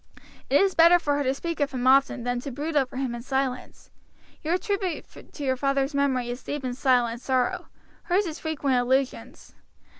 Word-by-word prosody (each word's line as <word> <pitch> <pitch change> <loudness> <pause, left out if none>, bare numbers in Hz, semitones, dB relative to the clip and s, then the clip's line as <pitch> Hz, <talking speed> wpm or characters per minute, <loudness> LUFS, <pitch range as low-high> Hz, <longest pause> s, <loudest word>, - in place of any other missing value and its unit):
It 280 - +5
is 390 -1 +3
better 335 +2 +7
for 290 -4 0
her 290 - 0
to 260 0 +1
speak 335 +3 -4
of 285 -1 +1
him 250 -1 -3
often 265 -1 +4
than 245 0 -1
to 265 - -6
brood 295 +5 -4
over 265 -2 0
him 260 -3 -2
in 240 - -6
silence. 265 0 -3 0.5
Your 330 +3 0
tribute 385 -3 -3 0.3
to 295 - -7
your 260 -1 +1
father's 275 +1 0
memory 260 -4 0
is 245 - -6
deep 290 -1 -5
and 250 -1 -3
silent 245 -3 +1
sorrow, 270 +9 0 0.4
hers 390 +2 +2
is 315 -3 -5
frequent 285 -5 -1
allusions. 260 +2 -1
275 Hz, 190 wpm, -25 LUFS, 255-315 Hz, 0.5 s, better